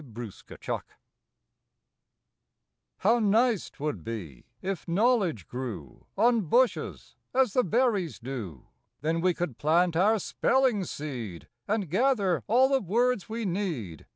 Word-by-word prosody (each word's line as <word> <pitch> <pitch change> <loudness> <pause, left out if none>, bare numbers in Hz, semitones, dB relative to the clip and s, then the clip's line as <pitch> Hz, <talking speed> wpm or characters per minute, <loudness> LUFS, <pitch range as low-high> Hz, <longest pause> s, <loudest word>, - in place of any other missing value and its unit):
EASY 115 -5 -9
KNOWLEDGE - - -3 2.2
How 230 +5 +3
nice 225 0 +2
'twould 140 - -4
be 90 - -7
if 190 -2 -4
knowledge 190 - +2
grew 115 - -7
On 235 -1 +4
bushes, 240 +8 0 0.2
as 260 -6 +3
the 250 - +3
berries 205 - +1
do! 115 - -7 0.4
Then 165 +2 0
we 180 -1 +2
could 160 -9 -4
plant 165 +3 +3
our 205 +6 +4
spelling 245 -1 +1
seed, 120 - -6 0.2
And 205 -2 0
gather 195 - +2
all 250 +5 +5
the 270 -1 +2
words 230 +3 +1
we 225 0 -3
need. 165 - -3
185 Hz, 125 wpm, -28 LUFS, -, 2.2 s, all